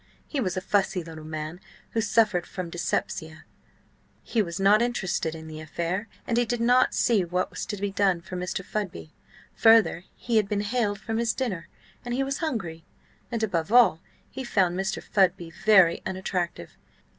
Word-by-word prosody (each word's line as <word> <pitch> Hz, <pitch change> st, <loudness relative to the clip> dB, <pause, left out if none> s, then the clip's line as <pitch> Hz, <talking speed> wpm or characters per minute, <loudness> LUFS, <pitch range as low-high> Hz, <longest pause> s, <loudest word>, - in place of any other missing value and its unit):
He 290 Hz, -, -3 dB
was 190 Hz, -6 st, -1 dB
a -, -, 0 dB
fussy 195 Hz, -2 st, +1 dB
little 160 Hz, -1 st, -9 dB
man 155 Hz, +2 st, -5 dB, 0.3 s
who 225 Hz, -, 0 dB
suffered 210 Hz, -4 st, +2 dB
from 180 Hz, -3 st, -6 dB
dyspepsia; 160 Hz, -2 st, -3 dB, 0.8 s
he 230 Hz, -, +1 dB
was 170 Hz, -2 st, -4 dB
not 200 Hz, +3 st, +5 dB
interested 190 Hz, -9 st, -1 dB
in 160 Hz, 0 st, -9 dB
the 155 Hz, 0 st, -8 dB
affair, 170 Hz, +6 st, -3 dB, 0.2 s
and 235 Hz, -, 0 dB
he 240 Hz, -, +3 dB
did 240 Hz, +1 st, -2 dB
not 245 Hz, +2 st, +4 dB
see 225 Hz, -6 st, +3 dB
what 180 Hz, +1 st, -1 dB
was -, -, -5 dB
to 205 Hz, -, -4 dB
be 200 Hz, 0 st, -2 dB
done 195 Hz, -3 st, +2 dB
for 180 Hz, +2 st, -9 dB
Mr. 180 Hz, +1 st, -3 dB
Fudby. 180 Hz, -, -4 dB, 0.5 s
Further, 225 Hz, -6 st, +5 dB
he 235 Hz, -2 st, 0 dB
had 210 Hz, -2 st, +2 dB
been 205 Hz, -1 st, 0 dB
haled 205 Hz, -1 st, -1 dB
from 225 Hz, +1 st, -3 dB
his 230 Hz, -3 st, +1 dB
dinner, 195 Hz, -10 st, -3 dB, 0.4 s
and 240 Hz, 0 st, -3 dB
he 270 Hz, -, +1 dB
was 275 Hz, +1 st, -2 dB
hungry; 195 Hz, -, -3 dB, 0.5 s
and, 230 Hz, -2 st, -1 dB
above 180 Hz, -3 st, -1 dB
all, 235 Hz, -9 st, +6 dB, 0.3 s
he 265 Hz, -, -5 dB
found 190 Hz, -7 st, +1 dB
Mr. 190 Hz, +2 st, -2 dB
Fudby 180 Hz, -4 st, +1 dB
very 190 Hz, -2 st, +4 dB
unattractive. 180 Hz, -, -3 dB
195 Hz, 180 wpm, -26 LUFS, 175-225 Hz, 0.8 s, all